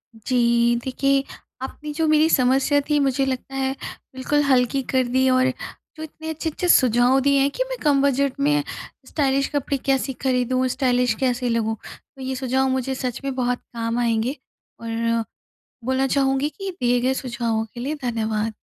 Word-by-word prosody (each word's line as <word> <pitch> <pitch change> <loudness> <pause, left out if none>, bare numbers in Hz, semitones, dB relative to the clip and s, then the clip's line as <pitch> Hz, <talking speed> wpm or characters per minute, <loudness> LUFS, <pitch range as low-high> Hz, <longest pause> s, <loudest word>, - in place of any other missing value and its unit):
जी 235 +1 +2
देखिए, 275 +1 +1 0.4
आपने 295 +3 -6
जो 320 +1 0
मेरी 310 +1 +4
समस्या 270 +1 +3
थी 300 -1 +3
मुझे 270 -1 +1
लगता 265 0 -4
है 265 0 0 0.4
बिल्कुल 290 +3 +1
हल्की 265 -1 +2
कर 260 -1 +3
दी 260 +2 +2
और 255 0 +3 0.5
जो 310 - -6
इतने 315 +1 -8
अच्छे-अच्छे 320 +2 -3
सुझाव 250 -1 +5
दिए 280 +1 +3
हैं 275 - +3
कि - - -1
मैं - - -3
कम 285 -3 +3
बजट 280 0 +1
में 295 +1 +2 0.4
स्टाइलिश 275 -2 +1
कपड़े 280 0 0
कैसी 270 0 +1
खरीदूँ 255 0 +1
स्टाइलिश 250 -2 +1
कैसे 250 -1 0
लगूँ। 225 -1 0 0.4
तो 270 - -12
ये 260 0 -3
सुझाव 260 +1 0
मुझे 260 0 -1
सच 250 -2 -4
में 275 -1 -2
बहुत 245 -1 0
काम 230 0 -2
आएँगे। 235 +2 0 0.4
और 230 0 -1 0.6
बोलना 260 +2 +1
चाहूँगी 270 +1 +1
कि 390 +4 -6
दिए 245 0 +2
गए 260 +2 +1
सुझावों 235 -4 -2
के 240 - -7
लिए 280 +5 -2
धन्यवाद। 220 -2 -1
260 Hz, 165 wpm, -22 LUFS, 245-275 Hz, 0.6 s, सुझाव